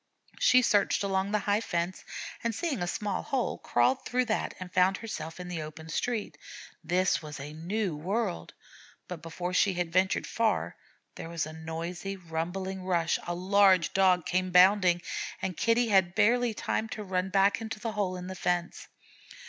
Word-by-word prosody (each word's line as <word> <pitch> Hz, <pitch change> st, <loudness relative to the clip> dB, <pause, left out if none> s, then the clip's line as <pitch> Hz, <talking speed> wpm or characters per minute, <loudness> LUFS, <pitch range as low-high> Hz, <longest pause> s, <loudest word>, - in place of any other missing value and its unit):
She 255 Hz, 0 st, +5 dB
searched 205 Hz, -3 st, +2 dB
along 195 Hz, 0 st, 0 dB
the 210 Hz, -, +3 dB
high 205 Hz, +1 st, +2 dB
fence, 175 Hz, -3 st, -2 dB, 0.4 s
and 230 Hz, -2 st, -1 dB
seeing 300 Hz, -, -2 dB
a 175 Hz, -, -1 dB
small 205 Hz, +2 st, -2 dB
hole, 265 Hz, -2 st, -2 dB
crawled 260 Hz, +1 st, +2 dB
through 250 Hz, +1 st, 0 dB
that 220 Hz, -2 st, -1 dB
and 185 Hz, -1 st, -8 dB
found 185 Hz, +2 st, +3 dB
herself 165 Hz, -7 st, -6 dB
in 180 Hz, -, -6 dB
the 175 Hz, -3 st, -4 dB
open 155 Hz, +1 st, -9 dB
street. 225 Hz, +6 st, -2 dB, 0.4 s
This 185 Hz, +1 st, +1 dB
was 150 Hz, -3 st, -8 dB
a 145 Hz, +2 st, -7 dB
new 180 Hz, +3 st, -2 dB
world, 190 Hz, +5 st, -3 dB, 0.5 s
but 175 Hz, -3 st, -7 dB
before 175 Hz, +2 st, -5 dB
she 190 Hz, +1 st, +3 dB
had 175 Hz, -1 st, -2 dB
ventured 185 Hz, +1 st, +2 dB
far, 230 Hz, -1 st, 0 dB, 0.4 s
there 165 Hz, -, -8 dB
was 170 Hz, -2 st, -2 dB
a 155 Hz, -, -8 dB
noisy, 165 Hz, +4 st, -5 dB
rumbling 185 Hz, +3 st, -4 dB
rush 175 Hz, -3 st, +1 dB
a 175 Hz, -, -2 dB
large 190 Hz, -1 st, +4 dB
Dog 185 Hz, -3 st, +4 dB
came 185 Hz, +1 st, 0 dB
bounding, 180 Hz, -1 st, +5 dB, 0.4 s
and 185 Hz, -2 st, -3 dB
Kitty 230 Hz, +4 st, +2 dB
had 190 Hz, -3 st, +3 dB
barely 240 Hz, +1 st, +3 dB
time 220 Hz, +1 st, -2 dB
to 215 Hz, -, -5 dB
run 185 Hz, -1 st, -1 dB
back 195 Hz, +3 st, +3 dB
into 220 Hz, -1 st, -5 dB
the 225 Hz, +1 st, -3 dB
hole 200 Hz, -4 st, -1 dB
in 180 Hz, -, -7 dB
the 190 Hz, -, -5 dB
fence. 175 Hz, -1 st, -2 dB
185 Hz, 175 wpm, -29 LUFS, 175-210 Hz, 0.5 s, She